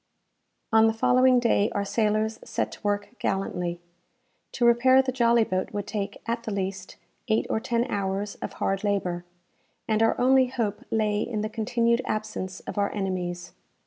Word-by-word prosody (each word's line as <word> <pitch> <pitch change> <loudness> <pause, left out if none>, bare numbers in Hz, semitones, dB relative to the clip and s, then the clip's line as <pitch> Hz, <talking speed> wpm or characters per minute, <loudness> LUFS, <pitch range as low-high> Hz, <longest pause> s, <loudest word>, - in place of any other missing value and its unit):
On 220 0 +6
the 225 - +1
following 255 +2 +4
day 225 -3 +2
our 200 0 0
sailors 215 +1 0
set - - -2
to - - -11
work 205 0 -1
gallantly. 180 -3 -2 0.7
To 240 - +1
repair 245 +2 +5
the 260 - -1
jolly 235 -2 +3
boat 185 -3 -2
would 205 -1 -3
take, 205 -2 -5
at 230 0 -2
the 220 - -5
least, 190 -1 -4 0.3
eight 220 - +2
or - - +1
ten 235 +1 0
hours 200 -1 -2
of - - -5
hard 195 +1 -1
labour, 180 -4 -1 0.6
and 220 0 +1
our 225 - +2
only 260 +1 +5
hope 225 -5 -3
lay 210 -1 +1
in 220 -3 -2
the 215 - -2
continued 235 +2 +1
absence 215 -3 -4
of - - -5
our 200 - +1
enemies. 180 -3 -3
215 Hz, 170 wpm, -26 LUFS, 195-235 Hz, 0.7 s, On